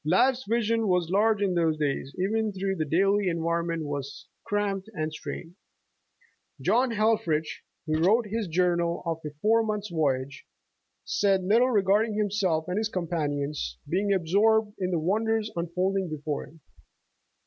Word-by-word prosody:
Life's 250 - +2
vision 225 0 +1
was 180 -2 +1
large 210 +1 +3
in 190 -2 +1
those 165 -3 +1
days, 140 -1 -2
even 215 +3 0
though 195 +1 -1
the 155 -4 -2
daily 195 +4 +2
environment 170 0 -1
was 140 -1 -6 0.2
cramped 205 -1 -2
and 155 -2 -2
strained. 165 +2 -7 1.1
John 250 +3 +2
Helffrich, 215 -8 0 0.2
who 155 -1 0
wrote 215 +8 +3
his 215 0 -3
journal 170 0 +1
of 165 -1 -2
a 150 - -4
four 225 +2 +4
months' 210 -2 -2
voyage, 140 -4 -1 0.6
said 195 -2 +2
little 230 +7 +4
regarding 210 0 +2
himself 195 -6 0
and 180 +3 -1
his 220 0 -1
companions, 150 - -2
being 200 +3 0
absorbed 205 +4 +2
in 185 -1 -1
the 175 - 0
wonders 215 +6 0
unfolding 180 +2 -1
before 150 -1 -4
him. 160 0 -19
185 Hz, 145 wpm, -27 LUFS, 160-210 Hz, 1.1 s, four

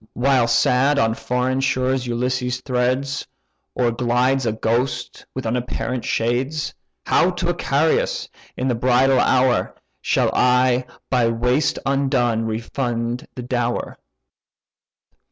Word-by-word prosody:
While 130 -1 +2
sad 125 +4 +3
on 115 -3 +2
foreign 125 +3 -1
shores 130 -1 0
Ulysses 125 +1 -2
treads. 130 +2 -1 0.5
Or 120 -2 +1
glides 125 +2 +1
a - - +2
ghost 115 +4 -2
with 130 - -4
unapparent 120 +1 -2
shades; 130 +6 -1 0.3
How 175 - +3
to 180 -1 -2
Icarius 160 -1 0 0.3
in 130 - -1
the 125 - +2
bridal 125 +2 +3
hour 125 0 +2 0.3
Shall - - +1
I, 125 0 +3 0.3
by 125 -3 +3
waste 125 +5 +1
undone, 130 -5 +1
refund 115 +1 -3
the 125 - -6
dower? 120 -1 -2
125 Hz, 115 wpm, -21 LUFS, 120-130 Hz, 0.5 s, sad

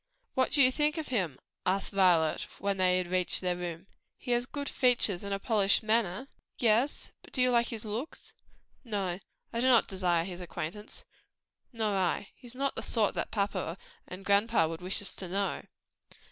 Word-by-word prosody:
"What 260 - +2
do 285 - +6
you 255 - +6
think 300 +3 +1
of 315 - -4
him?" 180 - -1 0.3
asked 195 +2 0
Violet, 175 -5 +3
when 200 -1 -1
they 185 -1 +3
had 185 - -1
reached 180 0 +1
their 180 -1 0
room. 175 0 -5 0.3
"He 245 - -5
has 240 0 +1
good 285 0 -5
features, 235 -8 +3
and 200 - -5
a 195 - +1
polished 200 0 +2
address." 220 +1 0 0.3
"Yes; 235 +4 +2
but - - -17
do - - -2
you 250 0 +4
like 235 -1 +3
his 225 -1 -6
looks?" 225 +9 -6 0.5
"No; 195 -6 -2 0.3
I 230 - -1
do 255 - +3
not 245 -3 +5
desire 180 -3 +1
his 180 0 -7
acquaintance." 180 +4 -7 0.7
"Nor 220 -4 -1
I; 190 +1 0
he's 245 -1 -11
not 275 +1 -1
the - - -3
sort 220 -4 +1
that - - -2
papa 200 -4 -2 0.3
and 185 +2 -9
grandpa 200 -3 +3
would 165 +1 -6
wish 185 +3 -3
us - - -3
to 185 - -5
know." 195 +2 -1
200 Hz, 190 wpm, -30 LUFS, 180-235 Hz, 0.7 s, do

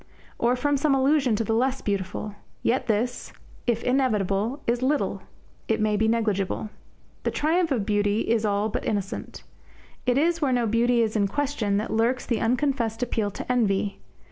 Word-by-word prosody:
Or 240 +2 +3
from 285 +3 +1
some 280 0 +2
allusion 270 -3 +3
to 225 - 0
the 225 - -1
less 260 +4 +1
beautiful? 200 +1 -3 0.3
Yet 250 +1 +1
this, 235 +3 -1 0.3
if 235 -1 +1
inevitable, 235 -1 0
is 240 +1 0
little; 285 +3 0 0.5
it 225 - +1
may 215 0 +2
be 220 +2 +2
negligible. 215 -2 0 0.5
The - - 0
triumph 330 +3 +1
of 230 -7 0
beauty 205 0 +1
is 225 -1 +1
all 205 0 +1
but - - -3
innocent. 200 -2 -3 0.6
It 250 +1 +3
is 335 +3 +2
where 280 -3 +2
no 245 -1 +2
beauty 235 +2 +3
is 220 -1 -2
in 200 -2 +2
question 240 -4 -1
that 215 +2 -2
lurks 235 +3 +1
the 230 -3 -1
unconfessed 240 -1 0
appeal 225 -4 -1
to 205 - -5
envy. 205 -5 +1
230 Hz, 170 wpm, -25 LUFS, 210-260 Hz, 0.6 s, Or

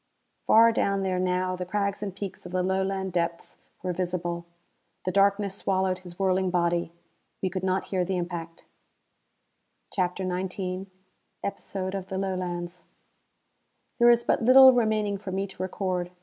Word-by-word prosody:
Far 230 +1 +7
down 200 -3 0
there 185 -1 0
now 185 0 0
the 180 - -4
crags 200 +2 -2
and 195 -3 -4
peaks 195 -2 -6
of - - -11
the 185 0 0
Lowland 190 0 -1
depths 170 -1 -2 0.3
were 180 -1 -1
visible. 175 -1 -3 0.6
The 185 - 0
darkness 200 +1 +2
swallowed 190 -1 0
his 175 -1 -11
whirling 190 -1 +1
body. 170 -1 0 0.5
We 185 - -1
could 185 0 -3
not 190 0 0
hear 185 -2 +1
the 185 +1 -1
impact. 170 -2 -5 1.3
CHAPTER 185 0 -1
XIX 185 +1 -3 0.6
Episode 190 -1 -4
of 190 -1 -4
the 190 - -4
Lowlands 180 -2 -3 1.1
There 240 0 +7
is 235 0 +5
but - - +1
little 260 +2 +9
remaining 215 -4 +1
for 195 -1 -6
me 195 +1 -1
to 190 -2 -9
record. 185 -1 -2
185 Hz, 150 wpm, -27 LUFS, 180-195 Hz, 1.3 s, little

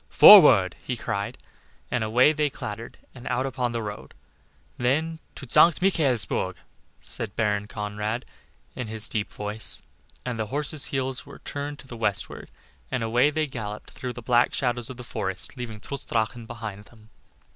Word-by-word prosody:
"Forward!" - - +9
he - - -4
cried, - - -3 0.5
and 120 - 0
away 125 +7 +4
they 150 -1 +1
clattered 110 -2 -7 0.2
and 125 - -10
out 125 +1 0
upon 125 -2 -2
the 115 -1 -3
road. 105 0 -8 0.6
Then 155 +7 0 0.2
"To 135 - -9
St. 165 +7 +6
Michaelsburg," 135 - +2 0.5
said 110 -2 -6
Baron 105 -2 0
Conrad, 105 +3 -4 0.5
in 125 - -4
his 110 0 -1
deep 105 -2 -3
voice, 105 +1 -2 0.4
and 125 -2 -3
the 110 - -1
horses' 145 +3 -2
heads 130 -1 -3
were - - -11
turned 145 0 -6
to 135 - -13
the 120 - -8
westward, 105 -3 -1 0.4
and 125 - -2
away 120 +5 +3
they 155 +1 0
galloped 110 -6 -7
through 125 -1 -6
the 120 - -9
black 120 0 +3
shadows 120 -2 -1
of 130 - -8
the 125 - -8
forest, 95 -2 -3
leaving 120 -4 -6
Trutz 140 +5 -6
Drachen 115 +1 -2
behind 105 -3 -7
them. 110 -1 -20
120 Hz, 165 wpm, -25 LUFS, 110-130 Hz, 0.6 s, Forward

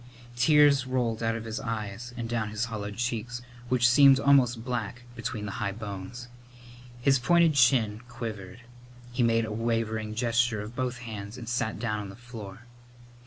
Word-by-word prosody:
Tears 140 +1 +5
rolled 120 -3 -1
out 115 0 0
of 115 0 -5
his 110 0 -4
eyes 115 +1 -5
down 115 -2 -2
his 105 +2 -2
hollowed 105 -3 -5
cheeks, 120 0 -3 0.3
which 125 -1 +4
seemed 135 +2 +7
almost 130 -5 +3
black 120 -1 -3
between 115 -3 -4
the 105 - -4
high 100 - -1
bones. 105 +3 -7 0.7
His 135 +1 +3
pointed 170 +4 +4
chin 120 -5 +3
quivered. 115 -3 -7 0.5
He 125 +1 -1
made 115 -1 +3
a 110 - -6
wavering 110 -1 -1
gesture 115 -2 +1
of 110 +3 -9
both 125 -1 -2
hands 105 0 -7
and 120 -3 -8
sat 120 -2 -1
down 105 -1 -2
on 100 -1 -6
the 95 - -10
floor. 115 -4 -10
115 Hz, 165 wpm, -28 LUFS, 110-125 Hz, 0.7 s, seemed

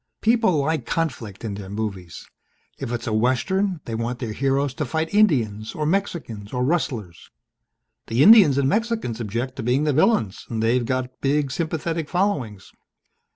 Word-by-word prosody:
"People 225 -6 +3
like 145 -3 -1
conflict 120 - -3
in 105 - -3
their 100 -1 -8
movies. 100 -5 -5 0.5
If - - -4
it's 120 -1 -3
a 110 - -2
Western 150 - +1
they 115 - -5
want 115 +2 -2
their 115 -4 -4
heroes 135 +2 0
to 150 - -3
fight 160 +6 -2
Indians 115 - +2
or 155 - -2
Mexicans 155 - -2
or 125 0 0
rustlers. 120 - -2 0.8
The 115 +5 +3
Indians 195 - +8
and 140 -1 +2
Mexicans 220 - -1
object 120 +5 -3
to - - -3
being 125 +5 +1
the 150 -1 +1
villains 135 - +1
and 115 -1 -2
they've 120 +1 +1
got 130 -1 -3
big 140 0 +1
sympathetic 160 0 -2
followings. 145 - -1
130 Hz, 160 wpm, -23 LUFS, 115-160 Hz, 0.8 s, Indians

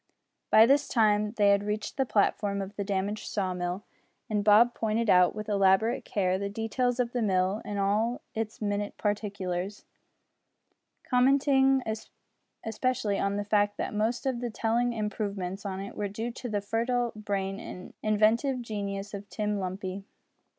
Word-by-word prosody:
By 220 - +8
this 280 +4 +3
time 210 -2 +2
they 205 -1 +5
had 200 0 +4
reached 210 0 -3
the 265 -2 0
platform 200 -1 +1
of 195 +1 -6
the 200 - -2
damaged 200 +1 -2
saw 190 -3 -1
mill, 180 +2 -3 0.5
and 210 -1 +1
Bob 215 +4 +6
pointed 225 0 0
out, 180 0 +5
with 215 0 -5
elaborate 200 +2 +3
care, 185 -2 0
the 200 0 -2
details 235 +4 -1
of 240 -1 0
the 245 - -1
mill 190 0 +1
in 205 - -4
all 210 +5 +1
its 220 0 -4
minute 205 0 -2
particulars, 200 -2 -3 1.2
commenting 270 +1 +3 0.9
specially 225 -3 0
on 200 0 0
the 205 0 -2
fact 205 0 +2
that - - -3
most 220 +4 -1
of 260 -3 0
the 240 - -2
telling 235 +2 0
improvements 200 -3 -3
on 190 -1 -4
it 200 +1 -7
were 205 - -2
due 220 +4 -4
to 245 +1 -7
the 205 -2 -1
fertile 235 +3 0
brain 200 -2 -3
and 180 -4 -9
inventive 220 +5 +2
genius 200 -2 -4
of 200 0 -7
Tim 210 -1 -2
Lumpy. 190 +1 -4
210 Hz, 160 wpm, -28 LUFS, 200-230 Hz, 1.2 s, By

